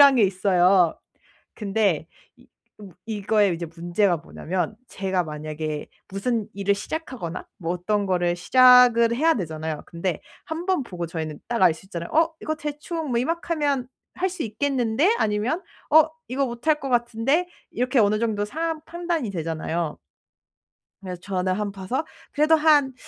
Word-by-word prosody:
이런 280 -2 +8
게 235 - +5
있어요. 185 -2 +3 0.6
근데 195 -6 0 0.3
이 - - -21 0.3
어 205 - -9 0.2
이거의 210 -3 +2
이제 170 0 -5
문제가 175 +3 0
뭐냐하면 180 +5 -3
제가 190 -2 -1
만약에 155 0 -5 0.2
무슨 215 +2 -2
일을 200 0 +1
시작하거나 205 - -5
뭐 170 -2 -2
어떤 205 +4 0
거를 175 -2 +1
시작을 245 +2 +6
해야 325 +5 +4
되잖아요. 160 -5 -4
근데 170 -1 -3 0.3
1 325 +2 -5
번 370 -6 +2
보고 180 -8 -5
저희는 160 -2 -5
딱 235 -3 0
알 180 -3 +7
수 165 - -15
있잖아요. 170 -3 -6
'어 325 +1 +3
이거 310 - -2
대충 300 +1 -4
뭐 235 - +1
이만큼 330 +7 -1
하면 285 -4 0 0.3
할 375 +1 0
수 360 -2 -5
있겠는데? 260 - +1
아니면 220 - 0 0.3
어 315 +1 +7 0.2
이거 270 +3 0
못 240 +4 -8
할 305 -1 +4
것 275 - -4
같은데?' 240 +7 +1 0.2
이렇게 250 +1 +1
어느 210 0 +3
정도 215 -2 0
상황 320 +7 -3
판단이 340 - -2
되잖아요. 165 -2 -3 1.1
그래서 180 -2 -6
저는 185 -1 -1
한 205 +1 -2
봐서 200 +10 -3 0.3
그래도 305 +2 +4
한 300 -4 +4
215 Hz, 315 characters per minute, -24 LUFS, 180-280 Hz, 1.1 s, 이런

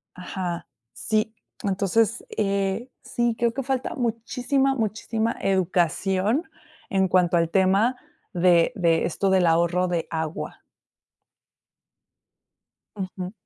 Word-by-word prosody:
Ajá. 180 -1 -5 0.3
Sí, 215 - -1 0.3
entonces, 205 +3 +1
eh, 200 +3 0
sí, 240 -1 0
creo 235 -1 +1
que 270 - -2
falta 260 0 -2
muchísima, 250 +3 0
muchísima 225 0 -1
educación 190 - +1 0.4
en 190 -1 +2
cuanto 180 -1 +3
al 165 -1 +2
tema 195 +7 +3 0.4
de 175 0 +4
de 170 -5 +2
esto 195 +3 0
del 190 -2 +4
ahorro 170 +2 +2
de 170 -2 -1
agua. 160 -1 -4 2.3
Ujú. 185 -2 -5
195 Hz, 105 wpm, -24 LUFS, 180-230 Hz, 2.3 s, de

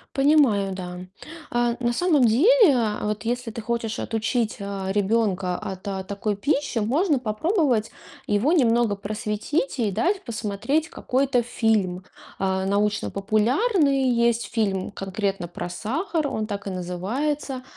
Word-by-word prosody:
Понимаю, 270 -9 +4
да. 180 -1 -6 0.5
А, 240 0 +1
на 240 -1 +1
самом 300 +1 +2
деле, 335 - +6
а 215 -3 -1
вот 210 +1 -2
если 245 0 -2
ты 230 - -7
хочешь 230 -1 -2
отучить, 225 0 -1
э, 200 -1 -4
ребенка 200 -3 +1
от, 190 -3 -7
а, 190 -1 -3
такой 200 +1 -3
пищи, 280 0 0
можно 285 - +1
попробовать 245 - 0 0.3
его 215 +10 +2
немного 235 - +3
просветить 215 +8 -2
и 215 -3 +1
дать 380 - 0
посмотреть 235 +7 -1
какой-то 255 -2 0
фильм. 210 -6 0 0.3
А, 190 0 0
научно-популярный 230 - +1
есть 235 -1 +1
фильм 195 -5 0
конкретно 195 -2 -3
про 175 - -5
сахар, 305 - -2
он 215 -1 -3
так 200 -1 -5
и - - -1
называется. 240 +10 -3
225 Hz, 130 wpm, -24 LUFS, 200-270 Hz, 0.5 s, деле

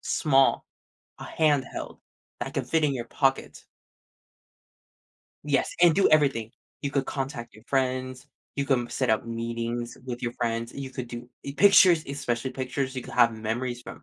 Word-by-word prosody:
small, 135 -3 +2 0.6
a - - -7
handheld, 150 -4 -1 0.4
that - - -5
can - - -1
fit 160 -1 +1
in 145 -2 +2
your 120 -2 -4
pocket. 135 +2 -1 1.8
Yes, 140 -2 +1
and 175 -2 +6
do 195 - +4
everything. 135 -8 +2 0.3
You 140 - -1
could 140 -2 -1
contact 135 -3 -5
your 110 - -16
friends, 130 0 -1 0.3
you 140 - 0
come 125 -4 +1
set 130 -1 -1
up 110 +1 +1
meetings 115 +1 -4
with 120 -1 -5
your 120 -1 -2
friends, 115 0 -2
you 135 -1 -6
could 125 -2 -6
do 120 +1 -8 0.2
i 140 - -4
pictures, 185 -5 +6
especially 130 -3 -2
pictures, 130 +1 -3
you 130 - -3
could - - -10
have 120 -2 +5
memories 120 +3 -3
from - - -10
130 Hz, 165 wpm, -26 LUFS, 120-140 Hz, 1.8 s, and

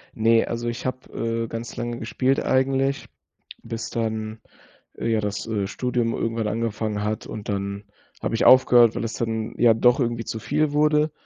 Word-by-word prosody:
Ne, 115 +1 +4
also 120 0 -4
ich 120 +2 -6
habe, 130 0 -4 0.3
äh, - - -4
ganz 115 +1 -6
lange 120 0 -4
gespielt 130 +4 0
eigentlich, 135 +1 +1 0.6
bis 115 0 -5
dann, 110 -1 -3 0.6
äh, - - -3
ja 110 -1 +2
das, 105 -1 -3
äh, 105 -4 -2
Studium 120 +1 -1
irgendwann 115 -1 -1
angefangen 110 -2 -2
hat, 105 +1 -3
und 105 -1 -7
dann 100 0 -3 0.4
habe - - -2
ich 115 - +1
aufgehört, 120 -3 +7
weil - - -2
es 115 -1 -3
dann 110 -1 -3
ja 120 -2 +6
doch 125 +4 +4
irgendwie 115 -2 -1
zu 110 - -4
viel 145 +7 0
wurde. 150 +1 +3
115 Hz, 175 wpm, -24 LUFS, 110-125 Hz, 0.6 s, aufgehört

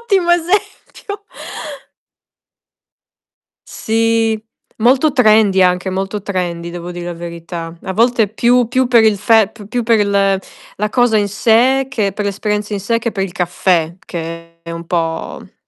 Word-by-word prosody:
ottimo 390 -7 +1
esempio. 405 +3 -2 2.4
Sì. 225 0 0 0.4
Molto 260 +6 +3
trendy 215 -6 +4
anche, 180 +1 +2
molto 195 +2 -3
trendy 175 -4 -3
devo 175 0 -7
dir 175 0 -6
la 175 - -4
verità. 170 0 -7
A 190 - -3
volte 230 +1 +3
più 240 +3 +2
più 255 0 +1
per 235 -3 +5
il 215 -2 +4
fe 215 +1 +3 0.2
più 245 +2 -1
per 225 -2 +3
l 195 -1 +2 0.4
la 210 +1 -1
cosa 245 -2 +3
in 205 -1 +1
sé 245 +6 +3
che 210 -7 -1
per 210 0 -4
l'esperienza 210 +1 -2
in 200 - -3
sé, 230 +4 0
che 230 0 -3
per 195 - -2
il 190 - -3
caffè, 175 -2 0
che 165 0 -7
è 170 - -9
un 170 0 -7
po', 165 -2 -2
mhmm - - -17
210 Hz, 155 wpm, -16 LUFS, 180-235 Hz, 2.4 s, per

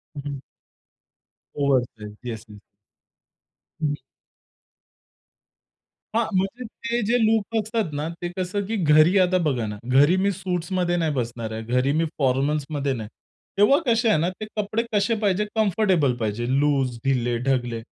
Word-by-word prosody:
हं, 145 - -5
हं. 140 -1 -4 1.2
ओव्हरसाइझ. 125 -7 0
Yes, 115 -2 -5
yes. 105 -1 -12 1.2
हं. 150 -2 0 2.2
हां, 230 0 +3
म्हणजे 195 +7 -1
ते 235 +2 -3
जे 235 +4 +3
लूक 220 0 +1
असतात 220 -4 -2
ना, 145 +2 -2
ते 175 - -2
कसं 185 +2 -2
की 225 - -2
घरी 155 +5 +5
आता 185 0 +3
बघा 125 -6 0
ना, 105 0 -5
घरी 140 +7 +5
मी 200 +2 +2
सूट्समध्ये 180 -1 -1
नाही 165 -2 +1
बसणार 115 -3 -3
आहे, 110 0 -5
घरी 125 +4 +1
मी 165 - +2
फॉर्मल्समध्ये 140 +1 0
नाही. 110 -4 -6 0.5
तेव्हा 210 +9 +5
कसे 230 -2 +3
आहे 210 - +4
ना, 165 +3 +1
ते 185 +4 -7
कपडे 215 +2 0
कसे 210 +3 +2
पाहिजे, 205 0 +1
कम्फर्टेबल 190 - +2
पाहिजे. 110 +1 -2
लूज, 135 -4 +1
ढिले, 120 -3 +1
ढगले, 120 -3 0
155 Hz, 145 wpm, -24 LUFS, 125-200 Hz, 2.2 s, घरी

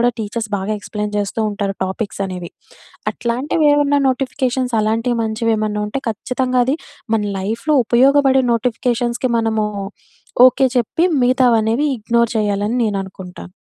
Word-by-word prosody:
కూడా 245 0 +3
టీచర్స్ 220 +1 -4
బాగా 195 +3 -3
ఎక్స్‌ప్లెయిన్ 210 0 -4
చేస్తూ 205 +2 -2
ఉంటారు 200 -1 -3
టాపిక్సనేవి. 190 -3 -5 0.6
అట్లాంటివి 265 +6 -1
ఏమన్నా 285 0 +2
నోటిఫికేషన్స్ 255 -1 -2
అలాంటివి 230 +3 0
మంచివేమన్నా 220 -1 -1
ఉంటే, 270 +6 -3
ఖచ్చితంగా 255 +4 -2
అది 270 +3 +1 0.4
మన 220 - +1 0.2
లైఫ్‌లో 200 +4 -2 0.3
ఉపయోగపడే 265 +3 +4
నోటిఫికేషన్స్‌కి 240 +1 -1
మనము 220 -1 0 0.8
ఓకే 265 +1 +3
చెప్పి, 245 +8 +1 0.2
మిగతావనేవి 245 +1 +3
ఇగ్నోర్ 235 +1 +1
చేయాలని 205 +2 0
నేను 205 -2 -1
అనుకుంటాను. 185 -1 -10
230 Hz, 120 wpm, -18 LUFS, 210-255 Hz, 0.8 s, ఉపయోగపడే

